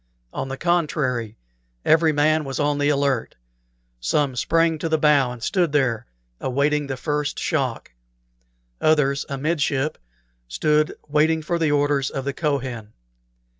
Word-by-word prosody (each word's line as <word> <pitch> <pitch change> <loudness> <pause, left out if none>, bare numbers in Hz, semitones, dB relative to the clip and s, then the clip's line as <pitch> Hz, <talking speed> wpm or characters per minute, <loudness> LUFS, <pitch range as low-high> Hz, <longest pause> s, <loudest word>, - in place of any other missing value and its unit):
On - - -3
the 135 0 -5
contrary, 145 -9 0 0.5
every 160 0 +4
man 155 +1 +2
was 135 -2 -5
on 145 0 +1
the 145 0 +2
alert; 140 -4 0 0.6
some 130 - 0
sprang 165 +5 +1
to 165 - -2
the 160 - +2
bow 145 -4 +3
and 120 -2 -9
stood 175 -6 +1
there, 125 -5 +1 0.3
awaiting 145 +3 0
the 135 -1 -4
first 150 0 -2
shock; 135 - -2 0.9
others, 140 -3 +2
amidship, 145 0 -1 0.5
stood 150 - +1
waiting 155 +2 +2
for 170 +2 -1
the 160 -2 +2
orders 145 -2 +1
of 135 -1 -5
the 140 - -2
Kohen. 130 -9 -3
145 Hz, 135 wpm, -22 LUFS, 135-155 Hz, 0.9 s, every